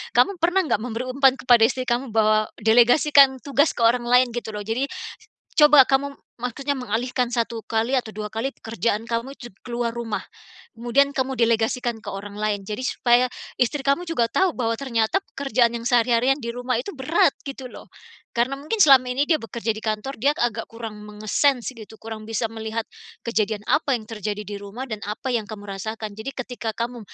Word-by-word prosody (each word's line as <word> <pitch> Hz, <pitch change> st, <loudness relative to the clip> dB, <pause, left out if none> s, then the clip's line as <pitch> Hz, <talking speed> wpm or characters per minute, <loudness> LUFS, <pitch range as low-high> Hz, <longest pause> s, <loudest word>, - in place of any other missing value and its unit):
kamu 395 Hz, -3 st, +3 dB
pernah 355 Hz, +3 st, +2 dB
nggak 290 Hz, -, 0 dB
memberi 230 Hz, +1 st, -4 dB
umpan 270 Hz, 0 st, +4 dB
kepada 240 Hz, -3 st, +5 dB
istri 255 Hz, +2 st, -3 dB
kamu 240 Hz, -1 st, -2 dB
bahwa 215 Hz, -1 st, +3 dB, 0.2 s
delegasikan 265 Hz, +5 st, +6 dB
tugas 285 Hz, +2 st, +2 dB
ke 235 Hz, -, -1 dB
orang 240 Hz, +1 st, +3 dB
lain 250 Hz, 0 st, +4 dB
gitu 230 Hz, -2 st, -5 dB
loh? 210 Hz, -, -4 dB
Jadi 230 Hz, +6 st, -1 dB, 0.7 s
coba 295 Hz, -3 st, +8 dB
kamu 275 Hz, +1 st, 0 dB, 0.2 s
maksudnya 275 Hz, +4 st, -2 dB
mengalihkan 250 Hz, 0 st, -1 dB
1 230 Hz, -1 st, -2 dB
kali 225 Hz, +4 st, -1 dB
atau 245 Hz, -4 st, 0 dB
2 210 Hz, 0 st, -6 dB
kali 230 Hz, +5 st, -1 dB
pekerjaan 225 Hz, -3 st, -2 dB
kamu 235 Hz, +4 st, -3 dB
jug 240 Hz, -5 st, -11 dB
keluar 235 Hz, -1 st, -3 dB
rumah, 230 Hz, -3 st, -4 dB, 0.5 s
kemudian 275 Hz, +5 st, +2 dB
kamu 265 Hz, 0 st, 0 dB
delegasikan 235 Hz, 0 st, +1 dB
ke 205 Hz, -, -5 dB
orang 200 Hz, +1 st, -7 dB
lain, 210 Hz, -1 st, -1 dB
jadi 210 Hz, +6 st, -5 dB
supaya 245 Hz, 0 st, +3 dB, 0.3 s
istri 255 Hz, +4 st, +1 dB
kamu 280 Hz, +6 st, +1 dB
juga 320 Hz, -9 st, 0 dB
tahu 375 Hz, +6 st, +2 dB
bahwa 230 Hz, -4 st, -1 dB
ternyata 230 Hz, -, 0 dB, 0.2 s
pekerjaan 255 Hz, -4 st, +1 dB
yang 235 Hz, 0 st, -3 dB
sehari-harian 245 Hz, +2 st, +3 dB
di 235 Hz, -4 st, -5 dB
rumah 245 Hz, +1 st, -2 dB
itu 250 Hz, -, -4 dB
berat 290 Hz, +1 st, +2 dB
gitu 265 Hz, -3 st, -8 dB
loh. -, -, -12 dB, 0.5 s
Karena 250 Hz, +4 st, +1 dB
mungkin 420 Hz, +9 st, -3 dB
selama 270 Hz, -6 st, +7 dB
ini 280 Hz, +3 st, +1 dB
dia 320 Hz, -, +4 dB
bekerja 225 Hz, 0 st, -3 dB
di -, -, -6 dB
kantor, 215 Hz, +5 st, -3 dB
dia 285 Hz, +3 st, +3 dB
agak 230 Hz, -2 st, -1 dB
kurang 225 Hz, -2 st, -8 dB
menge-sense 215 Hz, +5 st, 0 dB
gitu, 220 Hz, 0 st, -11 dB
kurang 220 Hz, -1 st, -7 dB
bisa 225 Hz, 0 st, -1 dB
melihat 220 Hz, 0 st, -4 dB, 0.4 s
kejadian 220 Hz, -2 st, 0 dB
apa 290 Hz, -2 st, +2 dB
yang 220 Hz, -, -9 dB
terjadi 210 Hz, -2 st, -4 dB
di 205 Hz, +1 st, -6 dB
rumah 205 Hz, +6 st, -7 dB
dan 215 Hz, -3 st, -5 dB
apa 220 Hz, +5 st, -4 dB
yang 225 Hz, -3 st, 0 dB
kamu 210 Hz, -2 st, -8 dB
rasakan, 215 Hz, +2 st, -5 dB
jadi 220 Hz, +6 st, -6 dB
ketika 240 Hz, -3 st, -5 dB
kamu 240 Hz, +1 st, -3 dB
235 Hz, 185 wpm, -23 LUFS, 220-265 Hz, 0.7 s, coba